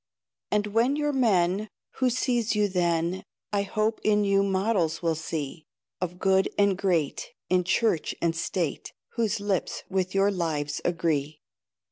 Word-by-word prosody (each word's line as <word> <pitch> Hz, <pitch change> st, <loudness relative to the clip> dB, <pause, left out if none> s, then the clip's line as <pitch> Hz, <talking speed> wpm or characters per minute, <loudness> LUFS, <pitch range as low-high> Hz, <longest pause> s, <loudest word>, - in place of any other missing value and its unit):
And 210 Hz, 0 st, +1 dB
when 230 Hz, +6 st, +2 dB
you're 295 Hz, 0 st, 0 dB
men, 205 Hz, -5 st, +2 dB, 0.3 s
Who 255 Hz, -1 st, +3 dB
sees 240 Hz, -2 st, 0 dB
you 210 Hz, 0 st, +3 dB
then 175 Hz, -1 st, 0 dB, 0.3 s
I 200 Hz, -, +2 dB
hope 215 Hz, +2 st, -1 dB
in 210 Hz, -1 st, +3 dB
you 200 Hz, -1 st, +3 dB
models 190 Hz, -4 st, 0 dB
will 165 Hz, -1 st, +2 dB
see, 160 Hz, -1 st, -5 dB, 0.3 s
Of 180 Hz, -1 st, -3 dB
good 190 Hz, +1 st, +3 dB
and 200 Hz, -1 st, +4 dB
great, 175 Hz, -7 st, -1 dB, 0.2 s
In 180 Hz, 0 st, +4 dB
Church 185 Hz, -2 st, +1 dB
and 165 Hz, -1 st, 0 dB
State, 165 Hz, -1 st, -2 dB, 0.2 s
Whose 225 Hz, -2 st, -1 dB
lips 200 Hz, -3 st, -2 dB
with 185 Hz, 0 st, -1 dB
your 195 Hz, +1 st, +4 dB
lives 155 Hz, -5 st, -2 dB
agree. 155 Hz, -4 st, -1 dB
190 Hz, 145 wpm, -27 LUFS, 170-210 Hz, 0.3 s, and